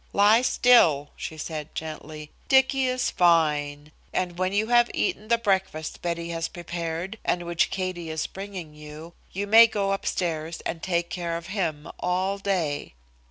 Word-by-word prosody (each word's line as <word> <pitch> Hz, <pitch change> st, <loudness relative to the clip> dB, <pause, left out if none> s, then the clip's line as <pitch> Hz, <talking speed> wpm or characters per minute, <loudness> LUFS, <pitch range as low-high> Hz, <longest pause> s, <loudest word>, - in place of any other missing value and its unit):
"Lie 210 Hz, +3 st, +5 dB
still," 170 Hz, -, +4 dB
she 160 Hz, -, -6 dB
said 155 Hz, -1 st, -6 dB
gently. 155 Hz, -1 st, -7 dB, 0.2 s
"Dicky 265 Hz, 0 st, +4 dB
is 255 Hz, 0 st, 0 dB
fine, 150 Hz, -4 st, +2 dB, 0.2 s
and 180 Hz, -1 st, -2 dB
when 185 Hz, 0 st, +1 dB
you 205 Hz, +2 st, +1 dB
have 240 Hz, 0 st, +5 dB
eaten 215 Hz, -, -1 dB
the 235 Hz, +1 st, +3 dB
breakfast 190 Hz, -8 st, -1 dB
Betty 170 Hz, -1 st, -3 dB
has 165 Hz, -1 st, -2 dB
prepared 175 Hz, +3 st, -5 dB
and 175 Hz, -, 0 dB
which 170 Hz, 0 st, +1 dB
Katie 185 Hz, -3 st, -4 dB
is 160 Hz, 0 st, -2 dB
bringing 190 Hz, -5 st, -7 dB
you, 150 Hz, +2 st, -11 dB, 0.2 s
you 200 Hz, +2 st, -3 dB
may 225 Hz, +3 st, +8 dB
go 200 Hz, -3 st, -1 dB
upstairs 165 Hz, -4 st, -2 dB
and 165 Hz, -, -4 dB
take 170 Hz, -1 st, -1 dB
care 170 Hz, -2 st, -3 dB
of 170 Hz, +2 st, -9 dB
him 160 Hz, -7 st, -2 dB
all 185 Hz, +2 st, -1 dB
day." 170 Hz, -, -2 dB
175 Hz, 160 wpm, -25 LUFS, 160-200 Hz, 0.2 s, may